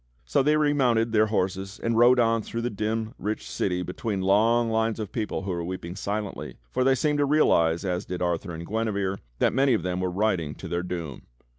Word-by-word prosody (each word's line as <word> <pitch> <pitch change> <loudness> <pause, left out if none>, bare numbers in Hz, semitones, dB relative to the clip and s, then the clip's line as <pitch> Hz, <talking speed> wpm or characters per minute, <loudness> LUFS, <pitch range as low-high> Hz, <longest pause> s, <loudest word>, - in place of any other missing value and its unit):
So - - +2
they 150 +3 +3
remounted 130 -7 +2
their 110 -1 +4
horses 95 -1 -2
and 115 0 +1
rode 120 +2 +6
on 115 -1 +3
through 115 +2 -5
the 120 - -1
dim, 110 +2 -2
rich 105 +2 -3
city 90 -1 -1
between 100 +3 -3
long 115 +5 +3
lines 110 0 0
of 110 - -5
people 110 -4 -3
who 95 - -3
were 85 -1 -2
weeping 90 0 -5
silently, 105 +1 -4
for 130 - +1
they 135 0 +4
seemed 150 +3 0
to 145 - +3
realize, 85 - +3
as 90 0 -2
did 90 -1 -5
Arthur 85 +1 -1
and 85 +1 -7
Guinevere, 100 -3 -1 0.2
that - - +2
manj^ 135 -1 +3
of 90 - -2
them 90 0 -2
were 90 - 0
riding 90 -6 0
to - - -8
their 85 0 -1
doom. 85 -6 -6
105 Hz, 210 wpm, -26 LUFS, 90-115 Hz, 0.2 s, rode